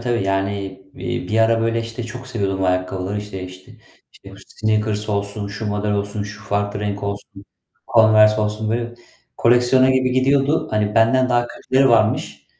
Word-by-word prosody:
tabii. 120 -2 -1
Yani, 95 +1 -1 0.3
eee, - - -4
bir 110 - 0
ara 115 0 +3
böyle, 115 0 0
işte, 115 +1 -6
çok 125 +2 -8
seviyordum 100 -6 -2
ayakkabıları. 90 +2 -1
İşte 105 -2 -7
işte 95 0 -12 0.4
işte 95 - -15
Sneakers 110 -1 -1
olsun, 100 0 -3
şu 105 +2 -6
model 105 0 -1
olsun, 100 +1 -2
şu 105 +1 -9
farklı 100 0 -2
renk 100 -1 -3
olsun, 100 0 -6 0.5
Converse 110 -1 +6
olsun. 105 +1 -2
Böyle 120 +1 -2 0.4
koleksiyona 125 +2 +4
gibi 130 -1 +1
gidiyordu. 135 +3 +2
Hani, 105 -1 0
benden 125 +3 +3
daha 120 -1 +2
kötüleri 135 +2 +1
varmış. 110 -2 +1
110 Hz, 155 wpm, -20 LUFS, 100-120 Hz, 0.5 s, Converse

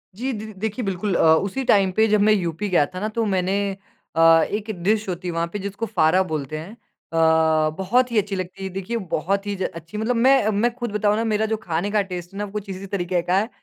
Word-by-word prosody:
Ji 255 +6 -2
the 215 -2 -6
the - - -10
देखिए 220 +4 -3
बिल्कुल 195 0 -1
अ, - - +2
उसी 200 +10 -1
टाइम 200 -6 +3
पे 220 +4 +3
जब 210 -1 +3
मैं 215 +1 +5
यूपी 185 0 -2
गया 175 -5 +4
था 185 +5 -8
ना 210 - -1
तो 225 - +2
मैंने 190 -1 0 0.6
अ, 165 0 +6
एक 210 +1 -3
डिश 215 +2 +1
होती 180 0 -4
है - - -1
वहाँ 165 0 -1
पे 205 - -3
जिसको 200 +3 -4
फारा 180 -2 +3
बोलते 155 -4 -4
हैं। 160 +6 -8
अ, 160 -7 +1
बहुत 240 +7 +1
ही 230 - 0
अच्छी 200 -1 0
लगती 185 +1 -6
है। 190 - -3
देखिए 195 +5 -4
बहुत 195 +5 0
ही 205 - -2
ज 190 - -3
अच्छी 165 +5 -8
मतलब 225 +3 0
मैं 255 -1 +4
मैं 220 +3 +1
खुद 240 -3 -4
बताऊँ 210 0 +1
ना 225 - 0
मेरा 220 -1 +1
जो 220 0 -1
खाने 185 -1 -2
का 210 0 +3
टेस्ट 180 -2 -7
है - - -9
ना 205 - -2
वो 200 - -11
कुछ 210 -1 -6
इसी 190 +1 -6
तरीके 180 -2 -1
का 180 +2 +1
है, 215 +4 0
195 Hz, 255 wpm, -22 LUFS, 175-215 Hz, 0.6 s, अ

